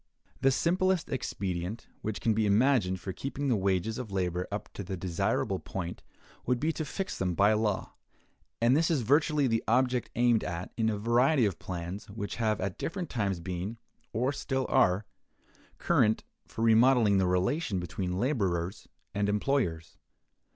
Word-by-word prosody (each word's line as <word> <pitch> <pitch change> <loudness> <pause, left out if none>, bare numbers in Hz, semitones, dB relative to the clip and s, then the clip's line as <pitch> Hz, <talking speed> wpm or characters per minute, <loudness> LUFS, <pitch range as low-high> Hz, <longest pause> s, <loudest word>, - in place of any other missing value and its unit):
The 135 - +4
simplest 180 +5 +1
expedient 95 -5 -3 0.2
which 110 -1 -3
can 115 - +2
be 110 0 +1
imagined 105 -3 +3
for 95 +1 -5
keeping 140 +4 -3
the 125 - +3
wages 100 +3 0
of 120 -5 -6
labor 90 -2 -1
up 100 - -4
to 100 - -5
the 95 +1 -5
desirable 85 -1 -1
point 90 -2 -5 0.5
would 125 0 +2
be 160 +4 0
to 155 - -3
fix 190 +6 -4
them 90 -2 0
by 100 +3 +4
law; 105 -2 -1 0.7
and 120 +3 +4
this 165 +2 +3
is 155 -6 +2
virtually 145 +4 +3
the 115 -3 +1
object 125 +1 +2
aimed 120 -2 +3
at 85 0 -5
in 110 -1 +1
a 105 - -1
variety 120 +5 +3
of 95 -5 -2
plans 90 +4 -6
which 100 0 -5
have 110 -2 +1
at 95 -1 -3
different 175 +1 -4
times 100 -6 -1
been, 90 +5 -4 0.3
or 125 +5 0
still 135 -2 -2
are, 95 +3 +3 0.7
current, 110 0 +2 0.2
for 115 - -4
remodeling 115 -2 +5
the 95 - +2
relation 95 - 0
between 90 +1 -3
laborers 95 - -1 0.3
and 100 0 0
employers. 105 - -1
110 Hz, 165 wpm, -29 LUFS, 95-130 Hz, 0.7 s, remodeling